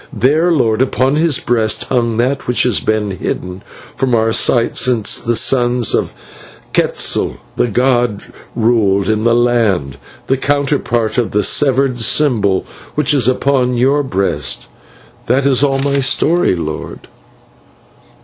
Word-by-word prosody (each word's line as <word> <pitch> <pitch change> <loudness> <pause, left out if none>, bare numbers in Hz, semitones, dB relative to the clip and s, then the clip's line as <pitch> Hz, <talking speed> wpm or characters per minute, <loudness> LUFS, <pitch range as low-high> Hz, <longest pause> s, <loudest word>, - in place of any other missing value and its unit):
"There, 155 +7 +1
lord, 120 -7 +1
upon 130 +1 +1
his 155 -2 +2
breast 115 -3 -1
hung 120 -3 -1
that 130 +4 -1
which 125 - +1
has 125 -5 +2
been 110 -1 -1
hidden 90 0 -5 0.3
from 130 -2 0
our 115 0 +1
sight 115 0 +1
since 120 -5 +1
the 120 0 -2
sons 120 -2 +2
of - - -1 0.6
Quetzal, - - 0 0.2
the - - +1
god, 120 -2 0 0.3
ruled 110 -5 +1
in 110 0 0
the 115 0 +3
land, 110 - 0 0.3
the 135 - 0
counterpart 135 -5 -1
of 120 - -1
the 105 0 0
severed 135 -3 +2
symbol 115 -6 +1 0.3
which 150 -1 +1
is 130 -5 +2
upon 130 -1 +1
your 135 +4 +2
breast. 95 - -2 0.6
That 130 +3 +1
is 135 -2 +2
all 140 -1 +1
my 140 +1 0
story, 160 - +1
lord." 80 -3 -6
120 Hz, 140 wpm, -15 LUFS, 110-135 Hz, 0.6 s, the